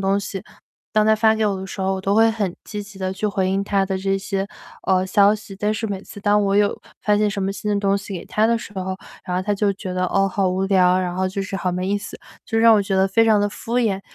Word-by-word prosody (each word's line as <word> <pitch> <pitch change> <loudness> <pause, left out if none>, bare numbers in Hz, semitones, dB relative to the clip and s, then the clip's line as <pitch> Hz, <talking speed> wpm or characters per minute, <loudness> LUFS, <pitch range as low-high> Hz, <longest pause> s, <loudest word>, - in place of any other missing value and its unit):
东 195 +1 +1
西， 195 -1 -6 0.5
当 215 0 +3
她 220 0 +5
发 220 0 +4
给 220 0 0
我 200 - 0
的 190 - -6
时 195 - -7
候， 190 0 +1
我 190 - -4
都 195 +1 0
会 225 +1 +5
很 205 -5 -2
积 210 -1 -5
极 200 -1 -13
地 190 0 -2
去 210 - -2
回 190 -2 0
应 195 +1 0
她 200 -1 +1
的 190 0 -2
这 195 0 0
些， 195 0 -3 0.4
呃， 185 -1 +3
消 200 +1 +4
息。 210 -2 -9
但 210 +2 0
是 220 +1 -3
每 200 -3 -4
次 205 - -11
当 205 0 +3
我 195 0 +1
有 205 0 +2 0.2
发 210 +1 +3
现 210 0 +2
什 200 -1 -3
么 195 +1 -1
新 210 +1 -4
的 205 - +1
东 200 0 +2
西 200 0 -7
给 170 - -8
她 215 +1 +1
的 235 +1 +2
时 215 - -10
候， 185 0 -3 0.3
然 180 - -2
后 185 - 0
她 205 +2 -1
就 200 0 +1
觉 190 -1 -6
得” 185 0 0
哦， 195 0 +3
好 195 0 0
无 185 +1 -1
聊 185 -2 +4
“然 180 -1 -2
后 185 +1 0
就 195 +1 -3
是 195 - -6
“好 180 -1 -1
没 180 +1 -2
意 205 - +1
思”。 205 - -8 0.3
就 225 - 0
让 225 0 +7
我 210 - +4
觉 195 0 -2
得 190 0 +4
非 225 +4 +4
常 215 -2 +4
地 205 - +1
敷 230 +3 -6
衍， 210 -5 +1
200 Hz, 320 characters per minute, -21 LUFS, 190-210 Hz, 0.5 s, 让